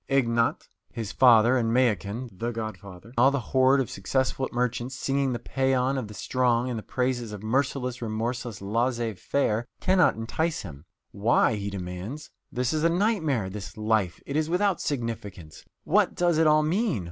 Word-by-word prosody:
Ignat, 120 Hz, -4 st, +1 dB, 0.2 s
his 110 Hz, -3 st, -5 dB
father, 120 Hz, -1 st, +6 dB
and 115 Hz, -3 st, +1 dB
Mayakin, 115 Hz, -1 st, 0 dB
the 115 Hz, +6 st, -3 dB
godfather, 110 Hz, -3 st, -7 dB
and -, -, -16 dB
all 130 Hz, +3 st, +7 dB
the 140 Hz, 0 st, -1 dB
horde 130 Hz, +2 st, +3 dB
of 130 Hz, -, -2 dB
successful 130 Hz, +6 st, -1 dB
merchants 125 Hz, +1 st, -2 dB
singing 135 Hz, 0 st, 0 dB
the 120 Hz, -, -1 dB
paean 130 Hz, +1 st, 0 dB
of 130 Hz, -5 st, -3 dB
the 105 Hz, -, -10 dB
strong 125 Hz, +2 st, +1 dB
and 115 Hz, -, -3 dB
the -, -, -7 dB
praises 125 Hz, -1 st, -2 dB
of 105 Hz, -1 st, -8 dB
merciless, 125 Hz, +1 st, -1 dB
remorseless 115 Hz, 0 st, -3 dB
laissez 115 Hz, +2 st, 0 dB
faire, 115 Hz, +2 st, -1 dB
cannot 185 Hz, -1 st, +3 dB
entice 160 Hz, +9 st, -2 dB
him. 75 Hz, -5 st, -10 dB, 0.3 s
Why? 110 Hz, +3 st, +2 dB
he 100 Hz, -1 st, -3 dB
demands. 100 Hz, -, -6 dB, 0.2 s
This 125 Hz, +1 st, -1 dB
is 155 Hz, 0 st, 0 dB
a 165 Hz, -, +4 dB
nightmare, 165 Hz, -, +1 dB
this 100 Hz, +3 st, -8 dB
life! 110 Hz, -5 st, 0 dB
It 140 Hz, -, -5 dB
is 155 Hz, +1 st, +1 dB
without 185 Hz, +1 st, +1 dB
significance! 105 Hz, -, -5 dB, 0.2 s
What -, -, +2 dB
does 175 Hz, -2 st, +2 dB
it 160 Hz, -, +4 dB
all 155 Hz, 0 st, +5 dB
mean? 185 Hz, -, 0 dB
120 Hz, 170 wpm, -26 LUFS, 110-135 Hz, 0.3 s, all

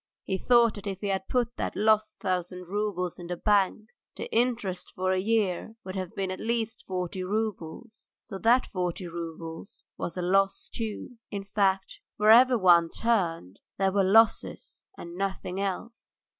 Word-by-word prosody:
He 190 Hz, -, -2 dB
thought 235 Hz, -2 st, +4 dB
that 205 Hz, 0 st, -8 dB
if 195 Hz, -1 st, -4 dB
he 205 Hz, -, -2 dB
had 190 Hz, -1 st, -2 dB
put 240 Hz, -2 st, -1 dB
that -, -, -3 dB
lost 215 Hz, 0 st, +2 dB
thousand 180 Hz, -2 st, -3 dB
roubles 190 Hz, -3 st, -2 dB
in 175 Hz, -, -8 dB
the 175 Hz, 0 st, -4 dB
bank, 210 Hz, +2 st, +1 dB, 0.3 s
the -, -, -6 dB
interest 230 Hz, -7 st, 0 dB
for 185 Hz, 0 st, 0 dB
a 185 Hz, -, +1 dB
year 215 Hz, 0 st, 0 dB
would 185 Hz, 0 st, -6 dB
have 185 Hz, -2 st, -5 dB
been 190 Hz, -1 st, -2 dB
at 185 Hz, -, -5 dB
least 225 Hz, 0 st, -2 dB
forty 185 Hz, 0 st, -3 dB
roubles, 215 Hz, +1 st, -4 dB
so 195 Hz, -, -8 dB
that 240 Hz, +4 st, +4 dB
forty 180 Hz, -1 st, -3 dB
roubles 165 Hz, 0 st, -8 dB
was 170 Hz, -, -4 dB
a 180 Hz, -, -2 dB
loss 195 Hz, +2 st, +1 dB
too. 225 Hz, +2 st, -5 dB
In 200 Hz, -1 st, -4 dB
fact, 195 Hz, -1 st, 0 dB, 0.2 s
wherever 235 Hz, +4 st, +6 dB
one 175 Hz, -4 st, +5 dB
turned 170 Hz, -, -1 dB, 0.2 s
there 195 Hz, 0 st, +2 dB
were 200 Hz, 0 st, +2 dB
losses 220 Hz, +4 st, +2 dB
and 170 Hz, -, -9 dB
nothing 190 Hz, 0 st, -3 dB
else. 200 Hz, +4 st, -5 dB
195 Hz, 165 wpm, -27 LUFS, 180-220 Hz, 0.3 s, wherever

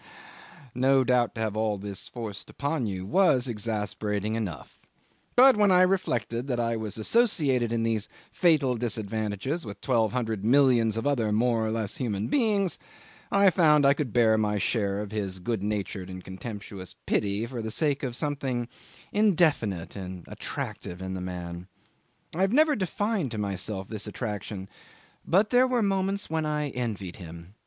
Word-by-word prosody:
No 130 Hz, +2 st, +3 dB
doubt, 125 Hz, -3 st, +2 dB
to 110 Hz, -, -4 dB
have 110 Hz, -2 st, -1 dB
all 110 Hz, -1 st, 0 dB
this 100 Hz, -1 st, -7 dB
forced 110 Hz, -5 st, -7 dB
upon 140 Hz, -4 st, -2 dB
you 95 Hz, -2 st, -4 dB
was 135 Hz, -, +3 dB
exasperating 105 Hz, -2 st, -2 dB
enough; 100 Hz, -9 st, -5 dB, 0.6 s
but 260 Hz, +1 st, +8 dB
when 205 Hz, -1 st, +4 dB
I 185 Hz, -1 st, +6 dB
reflected 125 Hz, -, 0 dB
that 125 Hz, -3 st, -1 dB
I 115 Hz, 0 st, 0 dB
was 110 Hz, -2 st, -4 dB
associated 135 Hz, -, +2 dB
in 115 Hz, -1 st, 0 dB
these 110 Hz, -2 st, 0 dB, 0.2 s
fatal 155 Hz, -8 st, +3 dB
disadvantages 110 Hz, -, -2 dB
with 100 Hz, -3 st, -8 dB
twelve 115 Hz, -4 st, +1 dB
hundred 110 Hz, -4 st, -2 dB
millions 120 Hz, -3 st, +4 dB
of 115 Hz, -, -2 dB
other 120 Hz, -7 st, +1 dB
more 115 Hz, +1 st, +2 dB
or 110 Hz, -, 0 dB
less 110 Hz, -2 st, -2 dB
human 105 Hz, -4 st, -2 dB
beings, 210 Hz, -8 st, +1 dB, 0.5 s
I 200 Hz, -1 st, +5 dB
found 150 Hz, -5 st, +5 dB
I 140 Hz, -, +7 dB
could 145 Hz, -4 st, -3 dB
bear 110 Hz, -2 st, +4 dB
my 105 Hz, -1 st, +1 dB
share 100 Hz, -1 st, 0 dB
of 105 Hz, -1 st, -6 dB
his 100 Hz, -4 st, -3 dB
good 110 Hz, +2 st, -2 dB
natured 100 Hz, -2 st, -3 dB
and 95 Hz, -1 st, -8 dB
contemptuous 95 Hz, -1 st, -8 dB
pity 100 Hz, +2 st, 0 dB
for 120 Hz, -1 st, -5 dB
the 110 Hz, -, -4 dB
sake 145 Hz, +4 st, 0 dB
of 125 Hz, -4 st, -3 dB
something 135 Hz, -5 st, -2 dB, 0.4 s
indefinite 160 Hz, -, +2 dB
and 95 Hz, -2 st, -7 dB
attractive 90 Hz, -, -5 dB
in 95 Hz, 0 st, -5 dB
the 95 Hz, -, -4 dB
man. 90 Hz, -1 st, -6 dB, 0.7 s
I 170 Hz, -, -2 dB
have 195 Hz, +1 st, +3 dB
never 300 Hz, +3 st, +4 dB
defined 205 Hz, -, -1 dB
to -, -, -4 dB
myself 100 Hz, -1 st, -3 dB
this 110 Hz, -1 st, -5 dB
attraction, 105 Hz, -3 st, -5 dB, 0.6 s
but 200 Hz, +5 st, +3 dB
there 250 Hz, +1 st, +5 dB
were 250 Hz, -3 st, +1 dB
moments 195 Hz, 0 st, 0 dB
when 160 Hz, -1 st, -1 dB
I 150 Hz, -1 st, -1 dB
envied 110 Hz, -8 st, -4 dB
him. 85 Hz, 0 st, -10 dB
115 Hz, 165 wpm, -27 LUFS, 105-145 Hz, 0.7 s, but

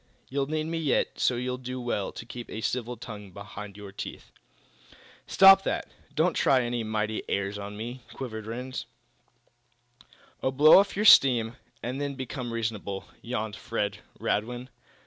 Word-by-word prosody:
You'll 135 Hz, 0 st, -1 dB
need 155 Hz, +1 st, -1 dB
me 165 Hz, +1 st, -2 dB
yet 150 Hz, -5 st, 0 dB
so 125 Hz, -, +3 dB
you'll 125 Hz, +1 st, -2 dB
do 130 Hz, 0 st, -5 dB
well 120 Hz, -5 st, -2 dB
to -, -, -9 dB
keep 120 Hz, 0 st, -8 dB
a 110 Hz, -, -5 dB
civil 120 Hz, +1 st, -2 dB
tongue 105 Hz, -3 st, -9 dB
behind 100 Hz, +1 st, -9 dB
your 100 Hz, -1 st, -9 dB
teeth!" 100 Hz, -, -8 dB, 1.0 s
"Stop 195 Hz, 0 st, +8 dB
that! -, -, -2 dB, 0.2 s
Don't 165 Hz, +3 st, +3 dB
try 130 Hz, -2 st, +3 dB
any 120 Hz, -1 st, -2 dB
mighty 110 Hz, 0 st, -1 dB
airs 100 Hz, +1 st, -1 dB
on 100 Hz, +1 st, -7 dB
me!" 120 Hz, +4 st, -6 dB
quivered 110 Hz, -5 st, -6 dB
Rhinds. 125 Hz, +3 st, -5 dB, 1.5 s
"Oh, -, -, +1 dB
blow 150 Hz, +6 st, +8 dB
off 200 Hz, 0 st, +1 dB
your 210 Hz, +2 st, 0 dB
steam, 125 Hz, -, +7 dB
quietly, 115 Hz, -1 st, -19 dB, 0.2 s
and 130 Hz, +4 st, -3 dB
then 140 Hz, -1 st, -2 dB
become 130 Hz, -1 st, -5 dB
reasonable," 110 Hz, -4 st, -3 dB
yawned 110 Hz, -3 st, -3 dB
Fred 100 Hz, -1 st, -3 dB, 0.2 s
Radwin. 120 Hz, +4 st, -2 dB
120 Hz, 160 wpm, -28 LUFS, 110-130 Hz, 1.5 s, Stop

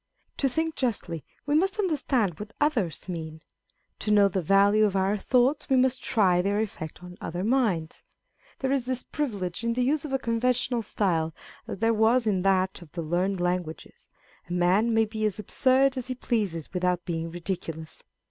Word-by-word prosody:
To 275 Hz, -, +1 dB
think 320 Hz, +5 st, -1 dB
justly, 185 Hz, -, -2 dB, 0.2 s
we 290 Hz, -, 0 dB
must 380 Hz, +7 st, +2 dB
understand 265 Hz, -, 0 dB
what 210 Hz, +1 st, -8 dB
others 230 Hz, -, 0 dB
mean: 160 Hz, -2 st, -6 dB, 0.6 s
to -, -, -3 dB
know 205 Hz, -1 st, +6 dB
the 190 Hz, 0 st, -1 dB
value 200 Hz, +5 st, +4 dB
of 200 Hz, -2 st, 0 dB
our 195 Hz, +2 st, +2 dB
thoughts, 255 Hz, +8 st, +1 dB
we 265 Hz, -, +4 dB
must 255 Hz, 0 st, +2 dB
try 185 Hz, -6 st, +3 dB
their 200 Hz, +2 st, 0 dB
effect 180 Hz, -6 st, -5 dB
on 180 Hz, 0 st, -10 dB
other 175 Hz, +2 st, -4 dB
minds. 210 Hz, -9 st, 0 dB, 0.6 s
There 265 Hz, -1 st, -1 dB
is 265 Hz, -3 st, 0 dB
this 255 Hz, -1 st, 0 dB
privilege 205 Hz, -10 st, -3 dB
in 230 Hz, 0 st, +1 dB
the 250 Hz, +1 st, 0 dB
use 285 Hz, +3 st, +1 dB
of 300 Hz, -, -6 dB
a 270 Hz, -, +2 dB
conven 245 Hz, 0 st, +1 dB
tional 240 Hz, -2 st, -1 dB
style, 165 Hz, -7 st, 0 dB, 0.3 s
as -, -, -5 dB
there 225 Hz, +3 st, +2 dB
was 225 Hz, +3 st, +3 dB
in 195 Hz, -4 st, +1 dB
that 190 Hz, -1 st, +1 dB
of 165 Hz, -4 st, -14 dB
the 170 Hz, -, -4 dB
learned 180 Hz, +4 st, 0 dB
languages 175 Hz, -2 st, -3 dB, 0.4 s
a -, -, -3 dB
man 185 Hz, +6 st, +3 dB
may 225 Hz, 0 st, +3 dB
be 215 Hz, 0 st, -5 dB
as 215 Hz, -2 st, 0 dB
absurd 260 Hz, +5 st, +3 dB
as 255 Hz, -, -4 dB
he 255 Hz, -, -3 dB
pleases 205 Hz, -, -2 dB
without 180 Hz, -1 st, 0 dB
being 165 Hz, -1 st, -3 dB
ridiculous. 165 Hz, -2 st, -6 dB
210 Hz, 185 wpm, -27 LUFS, 180-250 Hz, 0.6 s, know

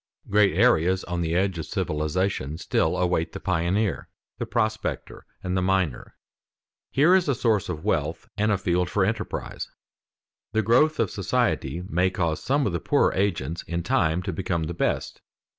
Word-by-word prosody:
Great 100 Hz, -4 st, +4 dB
areas 95 Hz, -5 st, +3 dB
on 90 Hz, 0 st, -3 dB
the 80 Hz, 0 st, -1 dB
edge 95 Hz, -1 st, +1 dB
of 80 Hz, -, -4 dB
civilization 75 Hz, 0 st, -1 dB
still -, -, 0 dB
await 90 Hz, -2 st, 0 dB
the -, -, -5 dB
pioneer, 95 Hz, +2 st, 0 dB, 0.3 s
the -, -, -3 dB
prospector, 110 Hz, -2 st, -2 dB, 0.2 s
and 90 Hz, 0 st, -2 dB
the 95 Hz, -, +1 dB
miner. 95 Hz, -7 st, -1 dB, 0.7 s
Here 155 Hz, +7 st, +4 dB
is 185 Hz, -5 st, +3 dB
a 140 Hz, -, +2 dB
source 110 Hz, -5 st, +1 dB
of 80 Hz, -3 st, -4 dB
wealth 75 Hz, +3 st, -1 dB
and 105 Hz, +1 st, +1 dB
a 100 Hz, -, +2 dB
field 90 Hz, -1 st, 0 dB
for 95 Hz, +1 st, +2 dB
enterprise. 110 Hz, +1 st, -4 dB, 0.8 s
The 110 Hz, 0 st, +2 dB
growth 130 Hz, +9 st, +3 dB
of 115 Hz, -4 st, +1 dB
society 90 Hz, -, -1 dB
may 90 Hz, +1 st, +2 dB
cause 85 Hz, -4 st, -1 dB
some 140 Hz, +2 st, +1 dB
of 100 Hz, -, -1 dB
the 85 Hz, -, -1 dB
poorer -, -, +2 dB
agents 85 Hz, -5 st, -1 dB
in 85 Hz, 0 st, -2 dB
time 80 Hz, +3 st, +1 dB
to 95 Hz, -, -3 dB
become 85 Hz, -1 st, -1 dB
the 80 Hz, +2 st, -3 dB
best. 85 Hz, -, -2 dB
95 Hz, 170 wpm, -25 LUFS, 85-105 Hz, 0.8 s, Great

